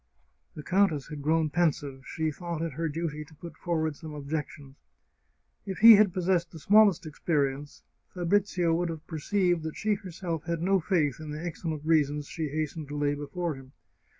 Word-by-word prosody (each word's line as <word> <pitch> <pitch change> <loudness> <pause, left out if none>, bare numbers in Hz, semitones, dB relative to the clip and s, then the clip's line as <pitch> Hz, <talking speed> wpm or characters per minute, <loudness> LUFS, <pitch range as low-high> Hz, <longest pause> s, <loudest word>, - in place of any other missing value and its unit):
The 150 - -8
countess 185 -7 +1
had 150 -1 -6
grown 155 +1 +1
pensive; 145 -5 0
she 160 -1 -2
thought 170 0 -5
it 165 -3 -3
her 165 +3 -2
duty 155 -1 -3
to 155 +1 -18
put 170 +3 -10
forward 160 -3 -1
some 155 0 -9
objections. 145 -1 -5 0.9
If 195 -2 -5
he 230 0 +10
had 205 -2 +5
possessed 180 -1 0
the 165 - -11
smallest 200 +1 +4
experience 145 -2 -2 0.3
Fabrizio 180 -1 +1
would 170 +1 0
have 160 -1 -7
perceived 175 +2 0
that 160 0 -6
she 215 0 +1
herself 175 -4 -5
had 170 -1 -2
no 195 +1 +3
faith 160 -7 0
in 155 -1 -8
the 155 +3 -5
excellent 160 -2 -4
reasons 150 -2 +2
she 160 +1 -4
hastened 155 +1 -3
to 145 +1 -5
lay 145 0 +1
before 160 +4 -3
him. 135 -1 -13
160 Hz, 180 wpm, -28 LUFS, 150-175 Hz, 0.9 s, he